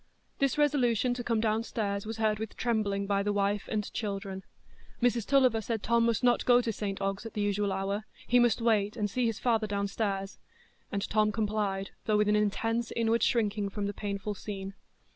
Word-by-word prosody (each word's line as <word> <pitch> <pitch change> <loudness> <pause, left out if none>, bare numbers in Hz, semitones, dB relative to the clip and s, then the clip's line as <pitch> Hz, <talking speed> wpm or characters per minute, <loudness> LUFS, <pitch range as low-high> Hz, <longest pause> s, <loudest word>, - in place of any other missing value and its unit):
This 275 +1 +1
resolution 255 -5 +2
to 245 0 -4
come 230 -2 +1
downstairs 215 -2 -1
was 225 0 -4
heard 215 -1 +1
with 220 -1 -6
trembling 210 -4 0
by 200 0 +1
the 205 +1 0
wife 205 0 0
and 210 -2 -2
children. 195 -2 -4 0.6
Mrs 240 -3 +1
Tulliver 255 -5 +4
said 225 -1 -3
Tom 235 0 +3
must 230 +1 0
not 245 -1 +4
go 245 -1 +6
to 235 -2 -1
St 200 -1 -3
Ogg's 195 +1 -2
at 225 - -9
the 210 - -1
usual 205 0 0
hour, 195 +2 -2 0.2
he 245 - +4
must 240 -1 +3
wait 215 -1 +2
and 210 -2 0
see 250 +1 +1
his 225 -2 -2
father 225 -3 +1
downstairs; 200 -1 -2 0.5
and 200 0 -2
Tom 215 0 +2
complied, 205 -3 -1
though 215 -1 +2
with 210 0 +2
an 210 - +4
intense 225 +3 0
inward 230 0 +2
shrinking 210 -3 +1
from 205 +1 -3
the 205 - -2
painful 200 0 -3
scene. 195 -1 -6
215 Hz, 195 wpm, -30 LUFS, 200-230 Hz, 0.6 s, go